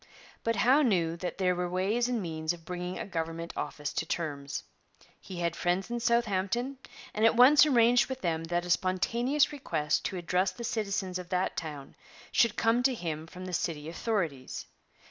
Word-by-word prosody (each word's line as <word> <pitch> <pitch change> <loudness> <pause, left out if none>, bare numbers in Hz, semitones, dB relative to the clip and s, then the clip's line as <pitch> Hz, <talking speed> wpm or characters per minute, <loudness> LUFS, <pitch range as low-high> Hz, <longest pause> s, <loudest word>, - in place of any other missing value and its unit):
But 230 0 +1
Howe 260 +6 +5
knew 175 - +2
that 180 +1 -4
there 185 -2 +2
were 180 0 -2
ways 205 +7 +1
and 235 -5 -1
means 160 -1 -2
of 165 -2 -13
bringing 180 0 -4
a - - -4
government 165 -2 -4
office 150 -1 -4
to - - -1
terms. 145 -4 -4 0.6
He 180 -2 -7
had 170 -1 0
friends 180 +5 -1
in 240 - -1
Southampton, 235 +2 0 0.3
and 215 - -1
at 225 0 +5
once 280 +5 +8
arranged 240 -2 +5
with 260 0 -5
them 165 -2 -1
that 175 +1 -1
a 175 - -2
spontaneous 235 - +2
request 155 - -1
to 190 - -2
address 180 +2 +1
the 235 - -8
citizens 200 -5 -2
of 180 -1 -9
that 185 0 0
town 145 -4 -6 0.4
should 230 -3 +3
come 230 +2 +2
to 255 0 +2
him 160 -5 -4
from 180 +2 -9
the 185 - -6
city 160 -4 -2
authorities. 165 - -2
185 Hz, 185 wpm, -30 LUFS, 170-235 Hz, 0.6 s, once